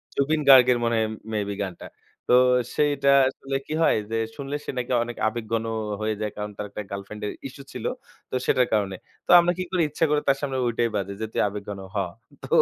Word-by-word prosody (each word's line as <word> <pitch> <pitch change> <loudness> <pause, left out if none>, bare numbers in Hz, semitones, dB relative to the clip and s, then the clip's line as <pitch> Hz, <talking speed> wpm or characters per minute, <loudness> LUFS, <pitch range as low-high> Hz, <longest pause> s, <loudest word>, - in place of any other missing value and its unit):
জুবিন 150 +2 +1
গার্গের 125 -2 +8
মনে 115 0 +1
হয় 110 - +1 0.2
may 105 - 0
be - - -2
গানটা। 95 -3 -7 0.4
তো - - +3 0.4
সেইটা 145 -2 +2 0.2
আসলে 135 +1 -5
কি 155 - -4
হয় - - +4 0.2
যে - - -1 0.2
শুনলে 140 0 -5
সে - - -7
নাকি 125 0 -3
অনেক 120 0 -7
আবেগঘন 115 0 -2 0.4
হয়ে 110 0 0
যায়, 105 -1 -2
কারণ 105 0 -4
তার 105 - -4
একটা 105 - -6
গার্লফ্রেন্ডের 105 +2 -5 0.2
ইশ্যু 140 +1 -11
ছিল। 125 - -6 0.4
তো - - -4
সেটার 125 -1 +3
কারণে। 100 -3 +1 0.3
তো - - -33
আমরা 175 0 +3
কি 185 - -1
করি, 180 -2 +1
ইচ্ছা 155 +3 +1
করে 150 0 +3
তার 135 0 +4
সামনে 135 -2 -2
ঐটাই 120 0 +1
বাজাই 100 0 -2
যে, - - 0
তুই - - +1
আবেগঘন 100 0 -6 0.2
হ। - - 0 0.5
তো - - -6
120 Hz, 210 wpm, -25 LUFS, 105-140 Hz, 0.5 s, গার্গের